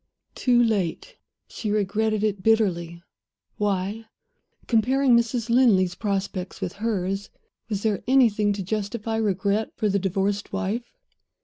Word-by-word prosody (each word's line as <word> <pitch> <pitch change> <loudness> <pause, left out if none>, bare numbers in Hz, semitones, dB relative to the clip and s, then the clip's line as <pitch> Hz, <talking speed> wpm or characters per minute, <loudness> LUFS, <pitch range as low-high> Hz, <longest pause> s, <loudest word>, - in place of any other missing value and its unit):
too 240 -2 +3
late! 200 -8 -1 0.3
She 220 - -5
regretted 215 +1 0
it 205 -3 0
bitterly. 175 -6 +1 0.5
Why? 205 +2 -1 0.6
Comparing 255 +3 +3
Mrs. 235 0 +1
Linley's 225 -7 +4
prospects 195 -2 -3
with 175 - -3
hers, 195 -2 -2 0.4
was 205 -2 -3
there 215 -3 0
anything 225 -6 +4
to 200 -1 -4
justify 215 +3 -3
regret 205 0 0
for 215 - 0
the 200 0 +1
divorced 195 +2 -1
wife? 205 +5 -3
210 Hz, 120 wpm, -24 LUFS, 195-225 Hz, 0.6 s, Linley's